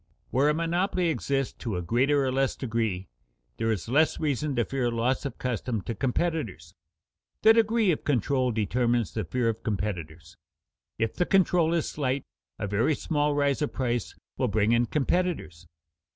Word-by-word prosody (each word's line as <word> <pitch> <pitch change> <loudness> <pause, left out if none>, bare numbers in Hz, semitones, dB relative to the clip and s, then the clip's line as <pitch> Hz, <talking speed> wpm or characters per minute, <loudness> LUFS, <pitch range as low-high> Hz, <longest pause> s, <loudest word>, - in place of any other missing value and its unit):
Where 140 +4 +3
a - - +3
monopoly 175 +2 0
exists 140 -4 -1
to 110 -6 -3
a 90 - -3
greater 135 +8 +2
or 130 - 0
less 135 0 +1
degree, 110 -7 -2 0.5
there 115 - 0
is 105 -3 -3
less 150 +7 +2
reason 145 -1 -1
to 120 -2 +1
fear 130 -3 -1
loss 120 +4 0
of 135 -4 -4
custom 120 -3 -2
to 115 - -3
competitors. 120 - -2 0.7
The 220 - +8
degree 225 -2 +3
of 155 - -2
control 130 -1 +1
determines 120 +2 0
the 110 -4 -2
fear 120 +7 0
of 115 0 -1
competitors. 85 -7 -4 0.6
If 115 -1 0
the 180 - 0
control 180 -4 +3
is 165 - 0
slight, 135 -2 -1 0.3
a - - -3
very 105 +9 +1
small 150 -1 0
rise 145 0 +1
of 150 - -1
price 120 -4 -2 0.2
will - - +2
bring 105 +1 +2
in 120 0 +3
competitors. 150 - -1
125 Hz, 165 wpm, -27 LUFS, 110-150 Hz, 0.7 s, The